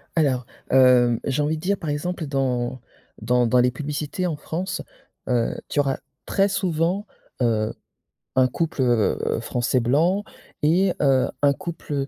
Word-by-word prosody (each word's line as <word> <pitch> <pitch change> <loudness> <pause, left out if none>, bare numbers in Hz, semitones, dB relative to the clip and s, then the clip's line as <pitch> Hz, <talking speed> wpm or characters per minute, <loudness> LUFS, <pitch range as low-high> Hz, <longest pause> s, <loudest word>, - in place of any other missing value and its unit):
Alors, 135 -6 +1 0.3
heu, 125 -2 +5
j'ai 140 +2 0
envie 155 +2 0
de - - -9
dire, 200 +3 0
par 160 - -5
exemple, 160 +3 -2
dans 130 -3 -1 0.4
dans 120 +2 +2
dans 125 +2 +4
les 125 0 +4
publicités 150 +6 -3
en 160 - -2
France, 180 +5 -4 0.5
heu, 120 -2 +1
tu 145 - 0
auras 135 -2 +1 0.3
très 195 0 +2
souvent, 180 +1 0 0.4
heu, 110 -3 +1 0.6
un 130 0 +5
couple, 155 +2 -2
heu, 120 -4 +1
français 125 +1 0
blanc 160 - +2 0.4
et 175 +5 +3
heu, 135 -2 +3
un 140 -1 +5
couple 150 -5 -4
140 Hz, 150 wpm, -23 LUFS, 125-165 Hz, 0.6 s, heu